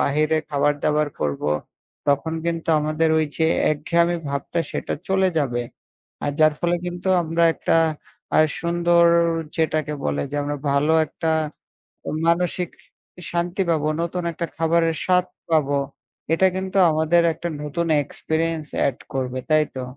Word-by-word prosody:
বাহিরে 155 +2 +2
খাবার-দাবার 145 +1 +1
করব। 70 -1 -2 0.7
তখন 150 +3 +1
কিন্তু 165 -1 -2
আমাদের 155 +1 +1
ওই 155 - +1
যে 160 - +3 0.3
একঘেয়ামি 170 +3 +1
ভাবটা 140 +4 -2
সেটা - - -3
চলে 190 0 +3
যাবে। 120 -5 0 0.6
আর 145 - +1
যার 155 0 +6
ফলে 175 0 +1
কিন্তু 175 +2 -4
আমরা 165 +1 +1
একটা - - +1 0.6
আ - - +5 0.2
সুন্দর 170 0 +3 0.5
যেটাকে 155 -2 0
বলে 70 0 0
যে 145 - -4
আমরা 145 0 -3
ভালো 145 +3 +2
একটা 160 +2 -3 1.0
মানসিক 175 +1 +1 0.6
শান্তি 175 +2 -1
পাবো। 155 -2 +1
নতুন 175 +1 -2
একটা 170 +1 -3
খাবারের 165 0 +2
স্বাদ 180 0 +3 0.2
পাবো। 145 -3 +2 0.6
এটা 190 +3 +4
কিন্তু 190 +1 -2
আমাদের 160 +2 +3
একটা 170 +2 -5
নতুন 165 +3 -2 0.2
এক্সপেরিয়েন্স 160 +2 -2 0.2
এড 130 - -2 0.2
করবে। 130 -1 -2
তাই 155 0 +5
তো? 130 - -3
160 Hz, 135 wpm, -22 LUFS, 150-170 Hz, 1.0 s, যার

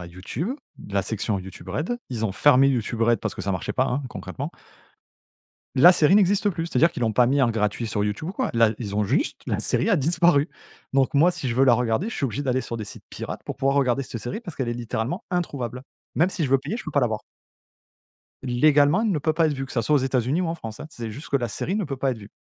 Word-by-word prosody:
à - - -8
YouTube, 95 - -5 0.4
la 100 -1 +1
section 105 -1 -2
YouTube 95 0 -10
Red. 160 - -2
Ils 115 -3 -2
ont 100 - -3
fermé 135 +4 +5
YouTube 115 -3 -1
Red, 115 -1 +3
parce - - -3
que - - -7
ça 100 +1 -1
marchait 95 - -3
pas, 130 - +2
hein, 140 +3 -1
concrètement. - - -6 1.2
La 170 +7 +8
série 175 0 +4
n'existe 205 +1 +4
plus! 165 -2 -3
C'est-à-dire 165 +1 +3
qu'ils - - -6
l'ont 115 -2 +1
pas 125 +2 +5
mis 140 +3 +2
en 125 - +4
gratuit 110 0 -1
sur 105 -2 -1
YouTube 105 - -3
ou - - -4
quoi. - - -2
Là, 115 -2 +4
ils 105 -4 -5
ont 105 0 +1
juste - - 0
la - - -1
série - - +1
a 205 - +4
disparu. 165 0 +3 0.4
Donc, 135 0 +2
moi, 160 +5 +5
si 140 -6 -4
je 115 - -1
veux 130 +2 +4
la 130 - +6
regarder, 125 - +1
je - - -5
suis 140 - -2
obligé 135 +4 -3
d'aller 130 -2 0
sur 115 -1 -5
des 110 - -5
sites - - -10
pirates - - -6
pour - - -5
pouvoir 135 +1 +1
regarder 135 -1 +2
cette 115 -3 -7
série 120 - -5
parce 185 -7 -8
qu'elle 130 -3 -3
est 120 - -1
littéralement 120 - -3
introuvable. 130 - -3 0.3
Même 170 +4 +3
si 180 -4 -2
je 135 - -2
veux 135 - +5
payer, 200 +11 -4
je 235 - -8
peux 155 - -5
pas 145 - +2
la 125 - +3
voir. 110 -1 -3 1.2
Légalement, 145 - +4
elle 215 -4 +1
ne 155 - 0
peut 155 +2 +1
pas 165 0 +3
être 150 - 0
vue, 135 0 -4
que - - -10
ça 115 - 0
soit 150 - +2
aux - - +5
États-Unis 130 +4 0
ou 180 - 0
en 165 - -2
France, 110 -7 -8
hein. 150 - -6
C'est 115 -2 -6
juste 145 - -9
que 140 - +2
la 120 -3 -1
série 175 - -3
ne 210 - -1
peut 140 -3 -4
pas 135 +1 0
être 120 - -4
vue. 100 - -12
130 Hz, 275 wpm, -24 LUFS, 115-160 Hz, 1.2 s, La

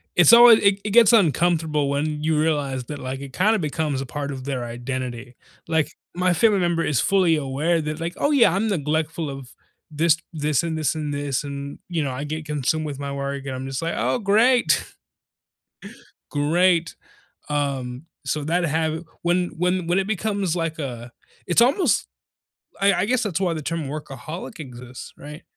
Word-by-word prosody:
it's 175 +6 +7
always 235 -1 +9
i 200 -1 +5
it 210 - -3
gets 230 +1 +6
uncomfortable 160 - +2
when 150 +1 -2
you 155 -1 +1
realize 145 -5 0
that, 150 +3 -6
like, 130 +1 -5
it 135 -2 -9
kinda 215 +6 +2
becomes 150 -3 -2
a 135 - -4
part 145 +2 -5
of 130 -1 -6
their 130 -3 -3
identity. 125 0 -5 0.3
Like, 160 -2 0 0.2
my 180 0 +2
family 205 +3 +3
member 170 -1 +1
is 135 -6 +1
fully 185 -4 +3
aware 150 +5 0
that, 155 +1 -4
like, 170 +1 -3
"Oh, 290 - +1
yeah. 230 - +5
I'm 205 +3 0
neglectful 155 -2 -1
of 135 -3 -8 0.4
this 160 +1 +3 0.2
this 150 -2 0
and 160 -1 -2
this 155 0 0
and 150 -2 -3
this, 145 -1 -2
and" 140 0 -6
you 165 -3 -1
know, 135 - -2
"I 130 +3 -4
get 155 +1 -5
consumed 150 +1 -1
with 140 -1 -6
my 140 0 -4
work," 140 0 -4
and 135 -1 -4
I'm 130 +1 -5
just 135 +2 -4
like, 165 +1 -2
"Oh, - - 0
great." 220 -4 +3 1.5
"Great." 165 +3 +2 0.5
Um, 135 -2 -2 0.2
so 150 -1 -2
that 175 +4 0
have 160 +1 -1 0.2
when 175 +1 +1
when 180 0 0
when 180 +2 +2
it 195 - -2
becomes 200 -4 -1
like 165 -1 -3
a 120 -4 -6 0.4
it's 175 +6 +4
almost 270 +10 +3 0.7
I 200 0 +5
I - - +1
guess 250 +1 +1
that's 190 -6 -1
why 175 -3 +1
the 155 - -5
term 165 0 -3
workaholic 155 - -7
exists, 125 -2 -9
right? 150 +2 -10
155 Hz, 185 wpm, -23 LUFS, 140-175 Hz, 1.5 s, always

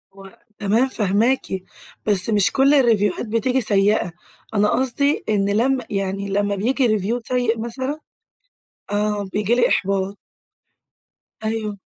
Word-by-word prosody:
هو 195 -1 -14 0.2
تمام، 220 +6 +2
فاهماكِ، 225 +3 +1 0.6
بس 205 -1 +1
مش 205 -3 +3
كل 275 +2 +4
الريفيوهات 225 -6 +2
بتيجي 240 +4 0
سيّئة، 200 -3 +2 0.4
أنا 210 0 +3
قصْدي 275 +3 +1
إن 200 -1 +1
لم 250 +5 +2
يعني 195 0 -2
لمّا 205 +1 0
بييجي 250 +5 +1
review 215 +3 0
سيّء 245 -3 0
مثلًا 260 +6 -4 0.9
آآ، 205 -1 -1
بييجي 210 +3 +1
لي 250 - +4
إحباط. 195 0 0 1.3
أيوه. 215 -2 -3
215 Hz, 120 wpm, -21 LUFS, 200-245 Hz, 1.3 s, كل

